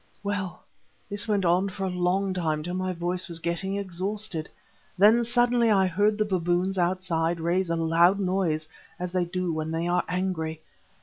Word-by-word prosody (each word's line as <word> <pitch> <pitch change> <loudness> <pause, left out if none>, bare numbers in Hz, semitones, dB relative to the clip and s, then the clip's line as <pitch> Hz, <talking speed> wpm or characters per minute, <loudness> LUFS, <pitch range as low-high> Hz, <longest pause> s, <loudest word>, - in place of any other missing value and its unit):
"Well, 190 -3 -3 0.5
this 205 +2 -1
went 205 -3 +1
on 180 +3 +3
for 195 +1 -6
a - - 0
long 180 +2 0
time 155 -4 -1
till 175 +2 -4
my 185 0 -1
voice 180 +1 -2
was 170 -2 -3
getting 170 +4 -2
exhausted. 190 -2 -2 0.5
Then 215 +5 +6
suddenly 240 0 +3
I 195 -3 +4
heard 205 +4 +2
the 215 - +1
baboons 185 0 0
outside 175 -2 0
raise 175 +2 0
a 170 - +1
loud 165 +4 +3
noise, 180 -5 0 0.3
as 180 0 -3
they 180 -1 +1
do 180 -1 -2
when 155 0 -3
they 165 +1 -2
are 175 +1 +1
angry. 165 -3 -2
180 Hz, 175 wpm, -26 LUFS, 170-195 Hz, 0.5 s, Then